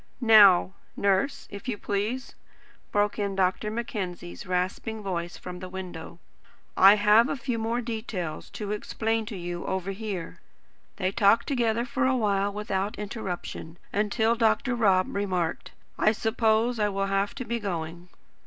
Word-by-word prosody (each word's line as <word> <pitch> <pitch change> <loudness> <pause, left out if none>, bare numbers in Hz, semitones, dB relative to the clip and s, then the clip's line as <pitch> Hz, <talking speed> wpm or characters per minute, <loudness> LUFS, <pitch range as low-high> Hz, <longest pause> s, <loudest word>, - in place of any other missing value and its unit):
"Now, 205 -6 +7 0.2
Nurse, 200 +7 +1
if 200 +4 -8
you 235 -5 -2
please," 210 +7 -3 0.6
broke 205 +1 +1
in 200 -1 -1
Dr. 190 +3 +1
Mackenzie's 190 - -5
rasping 185 +4 -2
voice 175 -3 -3
from 180 0 -8
the 185 0 -7
window, 180 -3 -7 0.6
"I 195 +2 +8
have 210 +4 +5
a - - -2
few 240 -2 -3
more 230 +2 -1
details 215 -9 -5
to 210 -1 -4
explain 220 +1 -2
to 210 -3 -5
you 175 0 -5
over 190 0 -2
here." 195 - -5 0.6
They 185 +1 -1
talked 205 +1 +4
together 235 -4 0
for 260 +1 0
a 260 0 +2
while 200 -3 +1
without 205 -1 -2
interruption, 190 -5 -6 0.2
until 220 +2 +2
Dr. 235 +2 +2
Rob 195 -6 +2
remarked: 185 -5 -1 0.3
"I 215 - +4
suppose 225 +1 +1
I 210 -1 +2
will 195 0 -1
have 195 +1 0
to 255 - -5
be 235 +1 -2
going." 175 -3 -5
205 Hz, 150 wpm, -27 LUFS, 185-225 Hz, 0.6 s, I